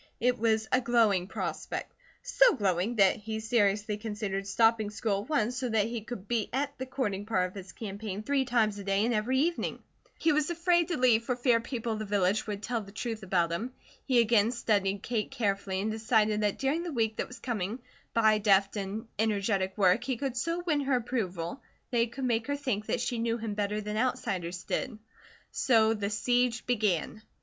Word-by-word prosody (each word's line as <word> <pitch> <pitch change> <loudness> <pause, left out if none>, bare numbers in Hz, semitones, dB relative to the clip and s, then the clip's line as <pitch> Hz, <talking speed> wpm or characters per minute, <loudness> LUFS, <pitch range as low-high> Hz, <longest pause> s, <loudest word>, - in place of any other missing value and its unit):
It 250 0 +1
was 220 -1 +1
a 255 - +4
glowing 225 -7 +3
prospect; - - -4 0.3
so - - +4
glowing 195 0 0
that 195 -3 +4
he 220 +1 -5
seriously 210 -2 +1
considered 205 -2 -4
stopping 225 +1 +3
school 205 -1 -1
at 210 - -12
once 250 -5 +1
so 260 -2 -2
that 220 0 +1
her 235 - -2
could 215 -4 -7
be 230 -2 0
at 280 +2 -1
the 260 - -4
courting 210 -7 -2
part 185 -5 +1
of 180 - -13
his 190 -2 -9
campaign 205 -1 -6
three 280 +2 +1
times 220 -5 +1
a - - -6
day 195 +2 +1
and 240 - +1
every 230 +4 +1
evening. 330 +5 -1 0.3
He 320 - +2
was 300 +1 +1
afraid 345 0 +2
to 350 - -2
leave 240 -3 +4
for 250 - 0
fear 245 -1 +3
people 235 -1 -4
of 215 - -4
the 215 - -3
village 200 +1 +1
would 205 0 -4
tell 235 -2 -1
the 200 -1 -12
truth 225 +1 -4
about 180 -3 +1
him. 230 +9 -3 0.3
He 260 -3 +1
again 225 -2 +4
studied 205 -5 0
Kate 230 -3 -1
carefully 200 -3 -1
and 215 +2 -1
decided 220 -1 +2
that 205 -1 0
during 280 +5 0
the 345 -1 -4
week 225 -5 0
that - - -2
was 250 - -10
coming, 225 -3 -3 0.4
by 220 -2 +4
deft 200 0 +3
and 200 +2 -4
energetic 200 -3 0
work 195 +3 +4
he 255 -1 -2
could 270 0 -3
so 335 +7 -1
win 305 -4 +2
her 275 -2 +1
approval 215 -5 -3 0.3
that 240 - +1
he 230 - +3
could 260 +3 -5
make 230 -2 0
her 285 - 0
think 250 -7 -2
that 245 - 0
she 240 -1 -2
knew 230 0 0
him 225 -2 -4
better 205 +1 -1
than 210 0 -4
outsiders 195 -8 -2
did. 215 - -3 0.5
So 225 -3 +3
the 205 -2 -2
siege 245 +3 +1
began. 215 -4 0
220 Hz, 205 wpm, -29 LUFS, 205-245 Hz, 0.5 s, a